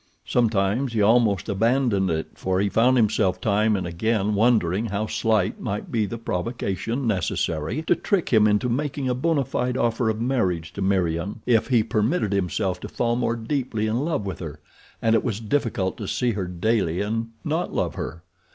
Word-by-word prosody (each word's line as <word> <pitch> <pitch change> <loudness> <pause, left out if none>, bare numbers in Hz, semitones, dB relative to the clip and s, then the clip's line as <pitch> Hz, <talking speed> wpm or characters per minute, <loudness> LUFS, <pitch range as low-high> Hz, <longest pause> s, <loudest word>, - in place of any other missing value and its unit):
Sometimes 115 +2 +1
he 110 - +1
almost 110 -3 +3
abandoned 110 -1 +1
it 80 -1 -2
for 95 0 -1
he 100 +1 +1
found 125 +5 +3
himself 100 -5 +2
time 105 +2 +2
and 95 - -2
again 105 +4 0
wondering 105 -2 +2
how 105 +1 -2
slight 110 -2 0
might 105 -3 -4
be 110 -3 +1
the 115 - -5
provocation 115 +3 -3
necessary 95 - -1
to - - +3
trick 200 -5 0
him 110 -3 +5
into 105 +4 +2
making 135 +2 -2
a 125 - +1
bona 140 +2 +1
fide 125 0 -1
offer 115 -1 +1
of 110 0 -2
marriage 95 -10 -1
to 100 - -6
Meriem 95 +1 0
if 115 -3 +3
he 120 -4 +3
permitted 110 - 0
himself 95 0 -1
to - - -7
fall 120 -1 0
more 120 -1 0
deeply 115 -2 -2
in 115 +5 0
love 150 -9 -1
with 95 - -5
her, 80 -3 -7 0.4
and 115 -1 +3
it 115 - +3
was 110 -4 -2
difficult 115 -5 -1
to 105 - -5
see 125 +4 0
her 100 -4 -3
daily 90 -1 0
and 115 +3 -1 0.2
not - - -1
love - - -1
her. 80 +6 -6
110 Hz, 185 wpm, -24 LUFS, 95-120 Hz, 0.4 s, him